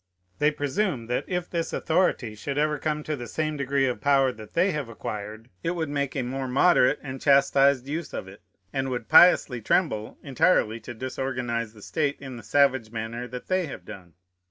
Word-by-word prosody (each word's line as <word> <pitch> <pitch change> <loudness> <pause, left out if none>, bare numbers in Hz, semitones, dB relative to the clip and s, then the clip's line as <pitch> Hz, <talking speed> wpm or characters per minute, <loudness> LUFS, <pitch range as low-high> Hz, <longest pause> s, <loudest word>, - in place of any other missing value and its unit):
They 150 - +4
presume, 145 - -1
that, 125 - -1
if 180 -1 -2
this 170 -2 -3
authority 160 -9 0
should 140 +6 -5
ever 150 0 +1
come 150 0 -2
to 155 - -2
the 120 -3 -7
same 155 +2 -2
degree 140 -1 +1
of 125 -2 -2
power 135 -2 +3
that 110 -3 -12
they 185 +3 +3
have 150 -7 -4
acquired, 110 +1 -7
it 170 +2 -1
would 160 -3 -2
make 140 -2 -2
a 135 - -1
more 130 +2 -3
moderate 140 +1 +4
and 135 -2 -7
chastised 140 -1 +4
use 155 +1 -4
of - - -5
it, 95 +2 -13 0.3
and 135 0 -1
would 120 -3 -4
piously 140 -8 +6
tremble 110 - 0
entirely 140 -6 +2
to 120 +2 -9
disorganize 125 -2 -3
the 105 -2 -15
state 145 -2 -1
in 135 -2 -8
the 120 - -8
savage 130 0 +2
manner 115 +2 -5
that 125 +1 -8
they 185 -2 0
have 140 - -9
done. 90 -4 -11
135 Hz, 195 wpm, -26 LUFS, 120-150 Hz, 0.3 s, piously